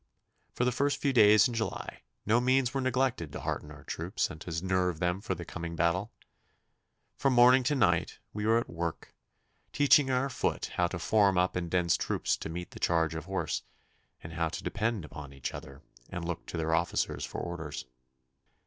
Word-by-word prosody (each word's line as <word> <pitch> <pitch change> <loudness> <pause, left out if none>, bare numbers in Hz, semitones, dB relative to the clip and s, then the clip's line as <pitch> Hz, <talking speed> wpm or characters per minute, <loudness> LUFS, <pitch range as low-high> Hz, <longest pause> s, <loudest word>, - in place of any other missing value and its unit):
For 125 - -1
the 125 - +2
first 145 +3 +1
few 140 -2 +1
days 105 -3 +7
in 120 - -5
July 115 -1 -4 0.2
no 115 +4 +3
means 130 0 +2
were 135 - 0
neglected 130 - 0
to - - -6
hearten 75 - -3
our 75 0 -12
troops - - -2
and 80 - -10
to 85 +1 -4
nerve 90 -2 +1
them 90 +2 0
for 95 -3 -2
the 85 0 -7
coming 85 0 -6
battle. 85 +6 +1 1.1
From 135 -1 +2
morning 125 +2 +7
to 145 +3 +2
night 90 - +2 0.2
we 105 +1 -2
were 115 +1 +5
at 115 - -1
work, 85 -1 -5 0.6
teaching 145 -1 +5
our 130 +1 +1
foot 135 - -2
how 90 - +2
to 85 - -5
form 100 +1 +3
up 90 +1 +2
in 85 -1 -2
dense 85 -1 +2
groups - - 0
to - - -6
meet 85 +2 -6
the - - -10
charge 80 -2 +2
of 80 -2 -5
horse, - - -2 0.6
and 80 - -8
how 80 0 0
to - - -6
depend 110 -6 -1
upon 70 -2 -9
each 70 -2 -5
other, 70 +2 -10 0.3
and 85 -1 -5
look 85 -1 -4
to - - -5
their 80 0 0
officers 85 +2 0
for - - -5
orders. 80 -6 -5
90 Hz, 195 wpm, -30 LUFS, 85-120 Hz, 1.1 s, days